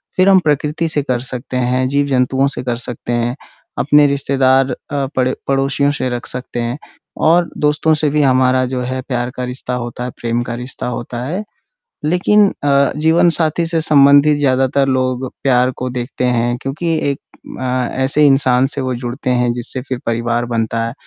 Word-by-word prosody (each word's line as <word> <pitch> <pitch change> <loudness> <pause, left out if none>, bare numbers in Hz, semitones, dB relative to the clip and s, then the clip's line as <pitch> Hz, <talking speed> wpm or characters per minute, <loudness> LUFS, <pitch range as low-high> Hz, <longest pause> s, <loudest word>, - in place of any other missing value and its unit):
फिर 185 +1 +4
हम 190 -1 +6
प्रकृति 150 +2 0
से 150 -2 0
कर 125 -3 -1
सकते 125 +1 -5
हैं, 125 +1 +1
जीव-जंतुओं 135 -1 +1
से - - -5
कर 125 -1 -1
सकते 120 0 -5
हैं, 120 +1 -1 0.4
अपने 145 +1 +5
रिश्तेदार 135 -1 +2 0.2
अ, 140 -1 -1
पड़े 130 0 +1
पड़ोसियों 140 +1 +1
से 130 -3 -2
रख 120 0 -4
सकते 125 -1 -5
हैं 120 +2 -3 0.5
और 170 +1 +3
दोस्तों 150 +2 +2
से 150 -1 +3
भी 150 +1 +1
हमारा 130 -1 +3
जो 125 0 -3
है 130 +1 -3
प्यार 120 -2 -2
का 125 - -4
रिश्ता 125 0 -4
होता 120 0 -5
है, 125 - -3
प्रेम 120 0 -1
का 120 - -5
रिश्ता 130 - -6
होता 120 0 -6
है। 180 +10 -3 0.6
लेकिन 200 +6 +3 0.2
अ, 140 -1 +3
जीवनसाथी 165 +1 +2
से 165 -1 -1
संबंधित 145 0 +5
ज़्यादातर 135 0 +2
लोग 130 0 -1
प्यार 125 -1 +3
को 125 - -3
देखते 125 +1 -3
हैं 120 0 0
क्योंकि 160 +5 -2 0.2
एक 140 - -6 0.4
अ, 130 -1 -1 0.2
ऐसे 145 +3 +3
इंसान 135 -2 +3
से 140 0 -4
वो 130 -1 -2
जुड़ते 125 +2 -4
हैं 125 -1 +2
जिससे 125 +2 -4
फिर 130 -2 -2
परिवार 115 +1 -1
बनता 115 -1 -1
है। 115 - -6
130 Hz, 180 wpm, -17 LUFS, 125-145 Hz, 0.6 s, हम